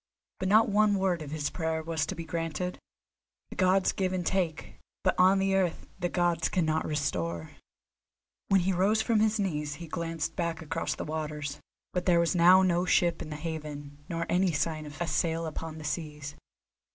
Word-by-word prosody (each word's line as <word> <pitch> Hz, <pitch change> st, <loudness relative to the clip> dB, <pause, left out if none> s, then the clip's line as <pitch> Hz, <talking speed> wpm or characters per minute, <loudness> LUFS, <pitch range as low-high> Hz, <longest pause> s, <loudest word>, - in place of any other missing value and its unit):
But 190 Hz, -, -1 dB
not 220 Hz, +3 st, +6 dB
one 210 Hz, 0 st, +3 dB
word 190 Hz, -3 st, +1 dB
of 150 Hz, -, -6 dB
his 150 Hz, -1 st, -2 dB
prayer 160 Hz, -2 st, -2 dB
was 160 Hz, 0 st, -1 dB
to -, -, -4 dB
be 165 Hz, -, -6 dB
granted. 165 Hz, +2 st, -3 dB, 0.7 s
The -, -, -7 dB
Gods 185 Hz, +1 st, +3 dB
give 185 Hz, -1 st, -1 dB
and 180 Hz, -2 st, -2 dB
take, 175 Hz, -5 st, -2 dB, 0.2 s
but -, -, +3 dB
on 185 Hz, +2 st, +6 dB
the 195 Hz, 0 st, +1 dB
earth 185 Hz, -3 st, 0 dB
the 175 Hz, -1 st, 0 dB
Gods 175 Hz, -2 st, +1 dB
cannot 160 Hz, -3 st, 0 dB
restore. 85 Hz, -, -2 dB, 1.0 s
When 195 Hz, -1 st, +4 dB
he 190 Hz, +2 st, +1 dB
rose 205 Hz, +5 st, +2 dB
from 225 Hz, -1 st, +2 dB
his 220 Hz, 0 st, +2 dB
knees 150 Hz, -6 st, -1 dB
he 170 Hz, +3 st, -8 dB
glanced 165 Hz, 0 st, -3 dB
back 170 Hz, -2 st, -2 dB
across 160 Hz, +1 st, -3 dB
the -, -, -5 dB
waters, 150 Hz, -2 st, -4 dB, 0.3 s
but 180 Hz, 0 st, -2 dB
there 175 Hz, -2 st, +5 dB
was 170 Hz, +1 st, +2 dB
now 180 Hz, +2 st, +7 dB
no 175 Hz, -1 st, +2 dB
ship 175 Hz, -1 st, +2 dB
in 160 Hz, -, -6 dB
the 150 Hz, -, -5 dB
haven, 150 Hz, -2 st, -6 dB
nor 170 Hz, 0 st, -2 dB
any 185 Hz, 0 st, +2 dB
sign 155 Hz, +1 st, -1 dB
of 145 Hz, -, -10 dB
a 175 Hz, -, 0 dB
sail 165 Hz, 0 st, 0 dB
upon 160 Hz, 0 st, -5 dB
the 155 Hz, -, -8 dB
seas. 150 Hz, -1 st, -4 dB
165 Hz, 190 wpm, -29 LUFS, 155-185 Hz, 1.0 s, now